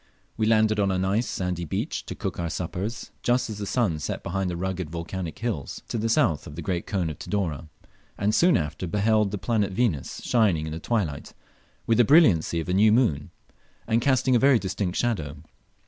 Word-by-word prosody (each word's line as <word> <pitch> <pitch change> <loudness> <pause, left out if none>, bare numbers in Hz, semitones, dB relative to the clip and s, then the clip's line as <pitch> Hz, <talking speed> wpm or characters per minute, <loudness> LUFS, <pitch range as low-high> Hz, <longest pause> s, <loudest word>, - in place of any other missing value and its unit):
We 110 - 0
landed 110 -1 +3
on 100 -1 +2
a 95 - 0
nice 95 +6 0
sandy 90 -2 -3
beach 80 - -3
to - - -5
cook - - -4
our 85 -1 -2
suppers, 95 +7 -4
just 125 -1 +1
as 105 - -7
the 100 - -4
sun 100 -11 0
set 75 - -4
behind 95 +1 -2
the 85 - -3
rugged 95 -2 -3
volcanic 85 +1 -5
hills, 110 - -4
to 115 - -2
the 115 +1 -1
south 110 - +2
of 75 - -9
the 85 - -6
great 85 0 -2
cone 90 -6 -1
of 75 - -10
Tidore, 85 -6 -3 0.5
and 105 +1 +1
soon 175 +8 +4
after 80 +3 -3
beheld 105 +3 +2
the 105 - -3
planet 105 -1 0
Venus 95 - -1
shining 100 -10 +2
in 80 - -5
the 80 - -5
twilight 85 -8 -2 0.5
with 115 0 +2
the - - +8
brilliancy 105 - +4
of 80 - -4
a 90 - -1
new 105 +3 +5
moon, 95 - +2 0.6
and 115 +1 +1
casting 130 -1 +2
a - - +5
very 135 0 +5
distinct 95 -2 -3
shadow. 80 - -1
100 Hz, 205 wpm, -25 LUFS, 85-115 Hz, 0.6 s, the